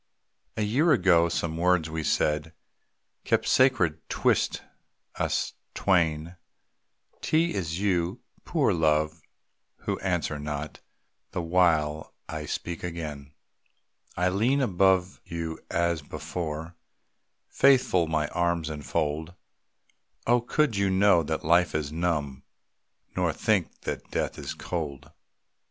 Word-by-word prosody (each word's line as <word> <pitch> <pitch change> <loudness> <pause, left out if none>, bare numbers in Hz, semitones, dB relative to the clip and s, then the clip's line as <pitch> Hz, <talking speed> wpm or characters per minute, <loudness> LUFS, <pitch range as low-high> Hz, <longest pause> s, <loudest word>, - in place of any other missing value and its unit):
A 110 - +1
year 135 +11 +3
ago 85 -8 +4
some 80 -1 -2
words 90 -1 +2
we 80 0 -4
said 75 +1 0 0.7
Kept - - +1
sacred 90 - +3
'twixt - - +1 0.5
us - - -1 0.2
twain, 85 -2 +1 0.8
'T 165 +2 +2
is 85 -2 -2
you, 90 -3 0 0.2
poor - - +1
Love, 80 0 +1 0.6
who - - -2
answer 75 - -1
not, 75 0 -5 0.5
The 90 - -2
while 80 -3 +1
I 75 -1 -5
speak 85 +3 -4
again. 75 -5 -6 0.8
I 90 +1 +2
lean 115 +9 +2
above 95 -5 +2
you 85 -1 -5
as 85 -2 0
before, 80 +2 -5 0.7
Faithful, 125 -11 +4
my 80 -1 0
arms 85 -2 0
enfold. 75 +2 -2 0.9
Oh, 120 +1 +4
could 125 0 +1
you 100 -1 +2
know 95 -2 +4
that 80 0 -3
life 85 +1 +3
is 75 -1 -1
numb, 75 -5 -1 0.7
Nor - - +1
think - - 0
that - - -5
death - - -2
is - - -5
cold! 75 -3 -5
85 Hz, 115 wpm, -27 LUFS, 75-90 Hz, 0.9 s, ago